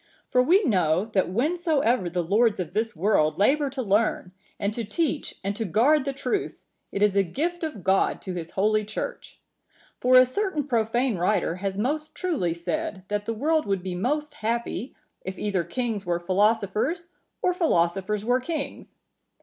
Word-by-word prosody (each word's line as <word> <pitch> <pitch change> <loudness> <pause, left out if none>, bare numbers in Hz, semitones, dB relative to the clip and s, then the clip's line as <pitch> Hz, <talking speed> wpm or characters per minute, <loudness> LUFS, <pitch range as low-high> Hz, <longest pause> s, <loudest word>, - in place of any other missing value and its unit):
For 250 - +5
we 360 +11 +4
know, 180 - +2
that 210 -4 0
whensoever 265 - +1
the 175 0 -1
lords 210 +5 +2
of 175 -2 -4
this 220 +1 -1
world 155 -4 +2
labour 280 +8 +3
to 265 -1 -4
learn, 205 -3 +1 0.3
and 200 +1 -1
to 235 - -3
teach 295 +8 -2
and 200 +1 -2
to 225 - -2
guard 260 - +3
the 275 - 0
truth, 280 +9 -3 0.3
it 200 - 0
is 205 -1 +3
a 200 - +5
gift 330 - -2
of 300 - -4
God 190 0 +2
to 185 - -4
his 170 -2 -5
Holy 215 +2 +3
Church. 215 +1 -6 0.6
For 255 +1 +4
a 255 - +8
certain 345 +3 -1
profane 240 -2 0
writer(952) 180 -1 +1
has 195 0 -3
most 300 +8 -2
truly 275 - -1
said, 175 +3 -3
that 205 0 -2
the 230 - -2
world 310 +5 +1
would 195 -2 -1
be 185 -1 -3
most 295 +11 -1
happy 235 0 -3 0.3
if 190 +1 -6
either 200 -4 -1
kings 215 +4 -3
were 175 -2 -1
philosophers, 210 - +1 0.3
or 360 - +3
philosophers 200 - +1
were 245 +2 +3
kings. 305 +1 -5
215 Hz, 175 wpm, -25 LUFS, 190-275 Hz, 0.6 s, a